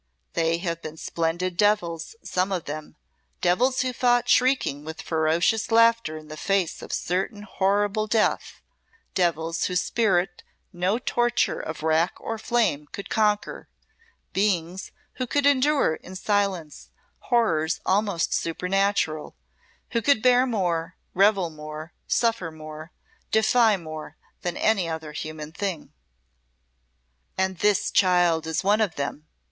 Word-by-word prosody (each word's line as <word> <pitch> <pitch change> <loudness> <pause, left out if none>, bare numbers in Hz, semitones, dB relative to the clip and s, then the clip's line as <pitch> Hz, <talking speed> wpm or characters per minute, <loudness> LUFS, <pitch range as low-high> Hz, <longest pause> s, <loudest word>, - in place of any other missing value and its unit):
They 165 0 +1
have 170 -1 -3
been 155 0 -8
splendid 170 +3 -2
devils, 205 - +1
some 185 +2 -1
of 180 -4 -2
them 155 +1 -7 0.4
devils 250 +9 +2
who 255 0 -1
fought, 245 0 +2
shrieking 250 - +2
with 160 +1 -7
ferocious 165 +7 +1
laughter 230 -8 +4
in 155 0 -11
the 155 - -8
face 195 -1 0
of - - -9
certain 195 +4 -2
horrible 205 +2 0
death; 220 0 0 0.5
devils 165 -2 0
whose 180 -1 0
spirit 190 -5 +1 0.3
no 180 +5 +1
torture 240 -1 0
of 160 0 -6
rack 160 +2 +2
or 225 -1 -4
flame 215 -12 0
could 200 - -8
conquer; 210 -1 0 0.6
beings 185 -2 -1 0.3
who 255 -1 -2
could 285 +3 +1
endure 285 - +3
in 185 - -12
silence 190 -5 -1 0.4
horrors 170 -10 +2
almost 195 -3 +1
supernatural; 180 -2 0 0.6
who 230 - +1
could 255 -2 +3
bear 250 0 +5
more, 180 -6 -1 0.2
revel 195 -3 +3
more, 155 +1 -8
suffer 230 -7 +1
more, 155 +1 -10 0.4
defy 220 0 +4
more 155 -3 -8 0.2
than 175 -1 -3
any 200 -6 +2
other 160 -1 -5
human 155 0 -6
thing." 185 -1 -4 1.4
"And 190 -1 -1
this 210 -2 +2
child 175 -4 +3
is 160 +2 -1
one 205 +3 +3
of 200 -7 0
them!" 145 +2 -4
185 Hz, 130 wpm, -25 LUFS, 160-215 Hz, 1.4 s, bear